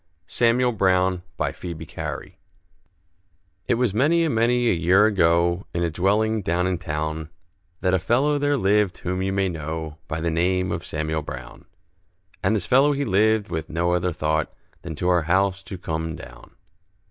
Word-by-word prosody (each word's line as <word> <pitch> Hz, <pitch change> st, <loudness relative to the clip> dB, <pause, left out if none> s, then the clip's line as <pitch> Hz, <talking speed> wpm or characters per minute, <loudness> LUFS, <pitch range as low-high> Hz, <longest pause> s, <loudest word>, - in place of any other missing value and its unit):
SAMUEL 120 Hz, +5 st, +2 dB
BROWN 95 Hz, -3 st, +2 dB, 0.2 s
BY -, -, -1 dB
PHOEBE 85 Hz, -3 st, -7 dB
CARY -, -, -6 dB, 1.3 s
It -, -, +3 dB
was 120 Hz, -4 st, +1 dB
many 155 Hz, +9 st, +3 dB
and 160 Hz, -, 0 dB
many 120 Hz, +2 st, +2 dB
a -, -, +4 dB
year 90 Hz, +4 st, +4 dB
ago, 85 Hz, -2 st, +2 dB
In 85 Hz, -, 0 dB
a 85 Hz, -, 0 dB
dwelling 105 Hz, +6 st, +1 dB
down 90 Hz, 0 st, 0 dB
in 90 Hz, -2 st, -1 dB
town, 80 Hz, -1 st, -3 dB, 0.5 s
That 90 Hz, 0 st, +1 dB
a 95 Hz, -, +3 dB
fellow 135 Hz, -, +1 dB
there 145 Hz, 0 st, +1 dB
lived 105 Hz, -3 st, +2 dB
whom 90 Hz, +1 st, -3 dB
you 95 Hz, +1 st, -1 dB
may 95 Hz, 0 st, +1 dB
know, 80 Hz, -2 st, -5 dB
By 80 Hz, -, -3 dB
the 85 Hz, +1 st, -1 dB
name 90 Hz, +2 st, +1 dB
of -, -, -3 dB
Samuel 80 Hz, +1 st, -2 dB
Brown; -, -, -9 dB, 0.8 s
And 100 Hz, +4 st, +2 dB
this 100 Hz, -5 st, -1 dB
fellow 140 Hz, +3 st, +4 dB
he 140 Hz, 0 st, -1 dB
lived 110 Hz, -1 st, +2 dB
with 80 Hz, -1 st, -3 dB
no 85 Hz, +2 st, 0 dB
other 90 Hz, 0 st, 0 dB
thought 80 Hz, -1 st, -1 dB, 0.3 s
Than 80 Hz, -2 st, -6 dB
to 90 Hz, -, -2 dB
our 90 Hz, -1 st, +4 dB
house 95 Hz, +4 st, +1 dB
to 95 Hz, 0 st, -8 dB
come 80 Hz, -1 st, -3 dB
down. -, -, -13 dB
90 Hz, 175 wpm, -23 LUFS, 80-110 Hz, 1.3 s, a